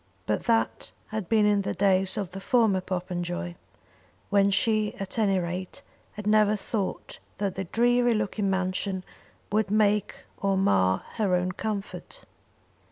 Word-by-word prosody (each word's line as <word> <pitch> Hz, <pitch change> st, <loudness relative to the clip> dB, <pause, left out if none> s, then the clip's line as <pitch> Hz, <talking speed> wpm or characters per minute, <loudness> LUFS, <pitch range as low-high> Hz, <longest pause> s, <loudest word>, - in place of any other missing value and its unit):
But 105 Hz, -, -1 dB
that 225 Hz, -1 st, +1 dB, 0.2 s
had 215 Hz, -4 st, -4 dB
been 220 Hz, -2 st, +4 dB
in 205 Hz, -1 st, +3 dB
the 195 Hz, -, -3 dB
days 190 Hz, -1 st, +2 dB
of 195 Hz, -3 st, -3 dB
the 195 Hz, +1 st, -7 dB
former 220 Hz, -5 st, +3 dB
Popenjoy, 175 Hz, -1 st, -3 dB, 0.8 s
when 200 Hz, -1 st, +4 dB
she, 215 Hz, +1 st, +1 dB
at 195 Hz, +4 st, -5 dB
any 200 Hz, -3 st, +3 dB
rate, 180 Hz, +1 st, -4 dB, 0.3 s
had 210 Hz, 0 st, -8 dB
never 215 Hz, 0 st, +4 dB
thought 205 Hz, -1 st, -4 dB, 0.2 s
that 200 Hz, -2 st, -1 dB
the 190 Hz, +1 st, -4 dB
dreary 240 Hz, +4 st, +3 dB
looking 205 Hz, -1 st, -1 dB
mansion 190 Hz, 0 st, -1 dB, 0.5 s
would 210 Hz, -1 st, +1 dB
make 210 Hz, -1 st, +2 dB, 0.2 s
or 195 Hz, -1 st, 0 dB
mar 95 Hz, -, +2 dB
her 200 Hz, -5 st, +2 dB
own 180 Hz, +1 st, 0 dB
comfort. 210 Hz, -, -5 dB
200 Hz, 145 wpm, -27 LUFS, 185-215 Hz, 0.8 s, been